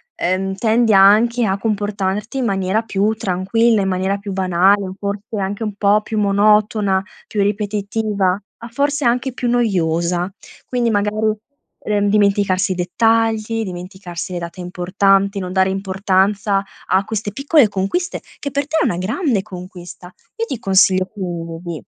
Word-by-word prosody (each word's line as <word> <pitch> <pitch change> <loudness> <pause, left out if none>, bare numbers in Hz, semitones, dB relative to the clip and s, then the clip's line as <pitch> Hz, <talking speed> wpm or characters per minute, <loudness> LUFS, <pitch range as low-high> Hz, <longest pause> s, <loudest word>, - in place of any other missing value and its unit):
ehm 190 +2 -1
tendi 225 +2 +2
anche 220 +5 +5
a 195 -1 0
comportarti 205 +2 -2
in 255 - 0
maniera 195 0 0
più 210 0 0
tranquilla, 215 +3 +1
in 195 - -1
maniera 190 +1 0
più 200 -1 -6
banale 190 +2 +2
o 185 - -7
forse 205 +2 -4
anche 195 +3 -3
un 210 -2 -4
po' 205 +1 +3
più 215 0 -3
monotona, 205 -1 +3 0.3
più 210 - -1
ripetitiva, 205 -1 -1 0.3
ah, 235 - -9
forse 285 +3 0
anche 250 +2 +1
più 245 -1 -2
noiosa. 180 -6 0 0.4
Quindi 245 -2 0
magari, 215 +1 +1 0.5
ehm, 205 -1 +1
dimenticarsi 200 -2 +2
i - - -7
dettagli, 225 +4 +1
dimenticarsi 180 -1 -7
le 175 - -3
date 170 +1 -8
importanti, 195 +3 +1
non 180 -1 -5
dare 190 0 +3
importanza 195 +1 0 0.2
a 190 +1 +2
queste 215 -1 -3
piccole 280 +1 +4
conquiste, 205 - -2 0.2
che 280 - -4
per 280 +1 -1
te 315 +2 -1
è - - +2
una 175 - 0
grande 220 - 0
conquista. 180 -2 -10 0.2
Io 460 - -1
ti 265 - -5
consiglio 190 -2 +3
quindi, 170 -4 -6
200 Hz, 150 wpm, -19 LUFS, 190-220 Hz, 0.5 s, anche